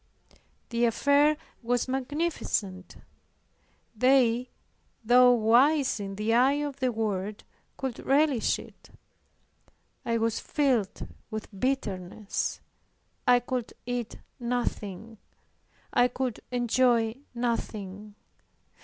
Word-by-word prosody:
The 235 0 +1
affair 285 +6 +3 0.2
was 245 +1 0
magnificent; 260 - -2 1.0
they, 250 0 +3 0.5
though 250 +2 +6
wise 245 +4 +4
in 195 -1 -5
the 215 +3 0
eye 255 +4 +5
of 285 -2 -4
the 260 -2 0
world, 210 -2 -3 0.3
could 265 -3 -4
relish 275 -3 +2
it. - - -14 1.1
I 230 -1 0
was 225 0 0
filled 250 -9 0 0.2
with 220 -1 -6
bitterness. 200 -4 -2 0.7
I 245 0 +6
could 245 -1 -4
eat 245 -2 -3 0.2
nothing, 225 -3 -3 0.7
I 245 - +5
could 250 -2 -3
enjoy 240 -1 +2 0.2
nothing. 210 -4 -3
240 Hz, 90 wpm, -28 LUFS, 215-255 Hz, 1.1 s, though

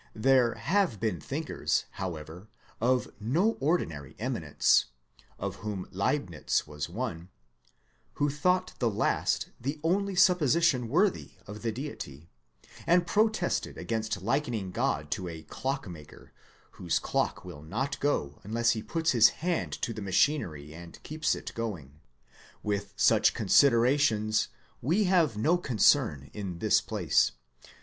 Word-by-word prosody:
There 125 +1 +3
have 180 - 0
been 110 -7 -1
thinkers - - -2
however 85 +1 -7 0.3
of 125 +2 +2
no 155 - +2
ordinary 80 - -1
eminence - - +2 0.5
(of - - -4
whom 105 -4 -5
Leibnitz 95 - -1
was 75 0 -5
one) 90 -4 -5 0.8
who 145 - 0
thought 180 +6 +1
the 120 - +2
last 100 - 0
the 140 +5 -3
only 195 +3 +1
supposition 170 -7 +3
worthy 195 - +1
of 105 +1 -9
the 115 - -1
Deity, 85 - -7 0.6
and 175 0 +4
protested 215 -2 0
against 110 -4 -3
likening 115 -5 -1
God 75 -3 -1
to 90 - -2
a 80 -2 -7
clockmaker 105 - -6 0.4
whose - - -1
clock - - -1
will 75 - -9
not 130 - -3
go 75 - -1
unless 115 +3 +1
he 110 - -2
puts 165 +7 0
his 115 -3 +7 0.2
hand 175 -2 0
to 115 - -1
the 110 - -7
machinery 90 - 0
and 85 +1 -11
keeps 155 0 -1
it - - -7
going. 85 -12 -5 0.6
With 100 -1 -2
such - - +4
con - - -4
siderations 115 -4 +4 0.3
we 170 - +2
have 170 - +2
no 165 +11 +2
concern 75 - +2
in 95 -5 -5
this 110 +3 +3
place. 105 -7 +1
115 Hz, 130 wpm, -29 LUFS, 90-150 Hz, 0.8 s, his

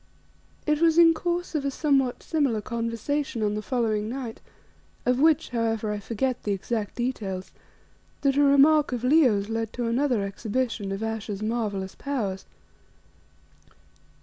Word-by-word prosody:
It 300 0 +1
was 330 -1 +4
in 335 -1 +8
course 345 +2 -2
of 300 -3 -1
a 280 - 0
somewhat 275 -3 +1
similar 280 -9 +1
conversation 230 +3 -2
on 210 0 +1
the 210 - -2
following 220 -3 -1
night, 245 -2 -6 0.6
of 250 +1 +2
which, 315 0 +3
however, 225 -3 -1
I 210 - -3
forget 240 +4 -2
the 205 - -1
exact 205 +1 -3
details, 205 -7 -3 0.7
that 275 -1 +2
a 285 - +4
remark 285 +2 +5
of 245 -1 -3
Leo's 250 -8 +4
led 225 0 -2
to 245 - -3
another 240 -2 +1
exhibition 215 +1 -2
of 195 +2 -3
Ayesha's 220 -2 -4
marvellous 210 -4 -2
powers. 215 -10 -3
235 Hz, 145 wpm, -26 LUFS, 215-280 Hz, 0.7 s, in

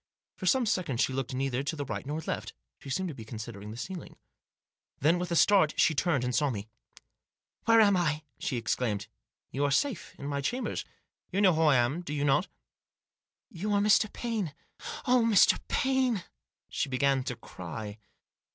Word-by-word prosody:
For - - -5
some 260 -3 +4
seconds 180 - -1
she 130 - -1
looked 130 -1 -3
neither 130 -1 -1
to 145 +3 -3
the 145 -2 -4
right 135 - -5
nor 150 +2 -3
left. - - -4 0.3
She 140 - -10
seemed 185 +7 -1
to - - -5
be 115 - -9
considering 110 -2 -7
the 110 - -8
ceiling. 180 +7 -7 0.8
Then, 165 +5 +3
with 180 -1 -3
a 170 - 0
start, 185 -3 +4
she 165 - +5
turned 150 -3 +1
and 125 0 -1
saw 145 +2 +2
me. 105 -4 -4 0.5
" - - -51
Where 230 0 +6
am 205 -3 +6
I? 155 -4 0
" 120 - -44
she 130 - -2
exclaimed. 115 -2 -1 0.2
" - - -57
You 140 - -1
are 145 - +3
safe 235 - 0
in 140 - -8
my 140 0 -2
chambers. 245 - -2 0.4
You 195 - -1
know 190 -3 +5
who 160 - +1
I 150 -3 +5
am, 125 +7 +2
do 150 -4 -5
you 145 0 0
not? 140 +7 +3 0.4
" - - -65
" - - -65
You 205 +2 -2
are 205 - +3
Mr. 210 +1 +4
Paine. 215 - -3 0.5
Oh, 250 -2 +4
Mr. 225 -4 +5
Paine! 260 -7 +1 0.2
" - - -64
She - - -1
began 135 0 +2
to 125 - -3
cry. 105 +3 -8
150 Hz, 205 wpm, -29 LUFS, 130-195 Hz, 0.8 s, Where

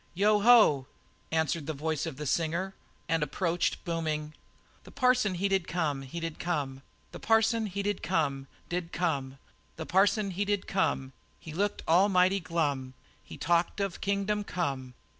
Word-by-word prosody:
"Yo 210 +3 +4
ho!" 205 - +6 0.4
answered 160 -1 0
the 155 - -3
voice 155 +2 -2
of 155 - -6
the 150 - -5
singer, 170 +6 -1 0.3
and 165 -1 +1
approached 170 +4 -1
booming: 155 -2 -2 0.5
"The - - -13
parson 250 -7 +2
he 190 +3 0
did 195 -3 0
come, 155 -6 -1
he 135 +5 -6
did 165 -2 -5
come; 140 -6 -2 0.3
The - - -9
parson 225 0 +2
he 200 +1 -3
did 205 -1 -1
come 140 -6 -1 0.2
did 175 -1 -3
come. 140 -6 -1 0.4
The - - -6
parson 200 +2 +2
he 190 +3 -1
did 205 -1 -1
come, 135 -8 -1 0.3
He 160 - -9
looked 200 +4 -1
almighty 185 +2 +4
glum, 145 -7 -2 0.3
He - - -11
talked 170 +3 +1
of 195 -3 -2
kingdom 200 +1 0
come 135 -10 -3
170 Hz, 160 wpm, -29 LUFS, 150-200 Hz, 0.5 s, ho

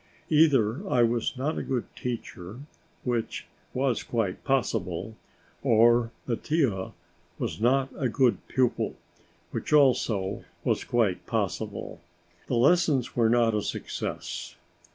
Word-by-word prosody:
Either 140 - +4
I 120 - +4
was 120 +2 0
not 145 +5 -1
a - - -2
good 125 -3 -2
teacher, 115 -3 -6 0.4
which 120 -3 -2 0.3
was 130 -2 0
quite 110 -6 -2
possible, 110 -6 -1 0.5
or 115 +1 +4
Mattia 120 - 0 0.4
was - - -4
not 130 +3 +3
a 130 - 0
good 125 0 +3
pupil, 125 -3 0 0.6
which - - -4
also 120 -9 +3 0.2
was - - +1
quite 110 -7 0
possible; - - -3 0.5
the 125 - 0
lessons 140 0 +3
were 115 -2 +3
not 115 -1 +3
a 105 - +1
success. - - -5
120 Hz, 115 wpm, -27 LUFS, 110-135 Hz, 0.6 s, Either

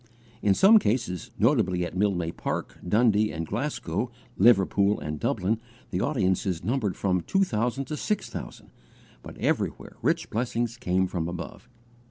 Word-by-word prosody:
In 100 -2 +3
some 215 +3 +7
cases, 105 - -1
notably 105 -7 +2
at 85 - -7
Mildmay 90 -4 +1
Park, - - -4
Dundee 105 +2 +3
and 80 +1 -4
Glasgow, - - -2 0.3
Liverpool 100 -1 +4
and 75 0 -5
Dublin, 100 +10 0 0.3
the 90 -1 -1
audiences 95 - 0
numbered 110 -2 0
from 90 -2 +1
two 195 - +2
thousand 125 - -1
to 150 - -4
six 210 +7 -2
thousand, - - -8 0.5
but - - -11
everywhere - - -2
rich - - 0
blessing 120 +1 0
came 95 -6 0
from 90 -3 -3
above. 85 0 -7
105 Hz, 145 wpm, -27 LUFS, 90-120 Hz, 0.5 s, some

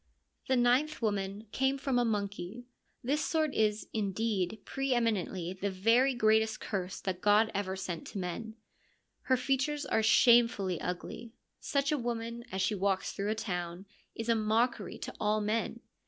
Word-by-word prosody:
The 260 - +3
ninth 255 +5 +3
woman 205 0 -1
came 265 +3 +1
from 265 -2 0
a - - +3
monkey: 205 +1 -3 0.4
this 290 +5 0
sort 310 -3 0
is, 215 -1 +1
indeed, 210 -1 -1
pre 270 -1 -1
eminently 190 -6 -1
the 190 +2 -2
very 230 +8 +3
greatest 220 -1 +3
curse 190 -2 -4
that 185 -2 -3
God 210 +2 +4
ever 195 -1 -2
sent 175 -3 -5
to - - -7
men. 195 +5 -4 0.7
Her 260 - +3
features 275 +3 0
are 220 - +1
shamefully 220 -6 +4
ugly; 225 +6 -5 0.3
such 280 0 0
a 300 - +1
woman, 235 0 -3
as 190 0 -1
she - - +1
walks 195 -1 0
through 200 +1 -2
a 215 - +1
town, 180 -3 -4 0.3
is 225 - -5
a 230 - +4
mockery 225 +2 0
to - - -6
all 210 0 +2
men. 215 +2 -1
220 Hz, 160 wpm, -31 LUFS, 195-245 Hz, 0.7 s, God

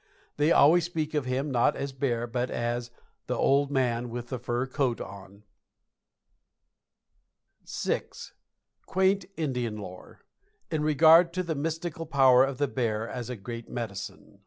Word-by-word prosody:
They 150 +3 +3
always 170 +3 +6
speak 160 -2 -3
of 150 -4 0
him 135 +3 -2
not 120 -2 +3
as 140 - -4
a - - -18
bear, 120 -3 -1
but 120 +1 -2
as 120 +1 -2 0.4
"the - - -1
old 140 +1 +3
man 125 -3 0
with 120 0 -6
the 130 - -4
fur 120 +1 -2
coat 130 -2 -1
on." 100 +1 -10 2.3
VI. - - -1 0.9
QUAINT 190 +1 +2
INDIAN 125 -8 -2
LORE 90 -3 -10 0.5
IN 155 -2 0
REGARD 160 +3 +6
TO 185 0 -1
THE 165 -2 -2
MYSTICAL 165 +2 -4
POWER 130 -4 +6
OF 135 -1 -5
THE 145 +1 +1
BEAR 115 -4 -2
AS 125 -1 -6
A 125 - -3
GREAT 115 +2 -8
MEDICINE. 100 -2 -7
130 Hz, 150 wpm, -28 LUFS, 120-155 Hz, 2.3 s, always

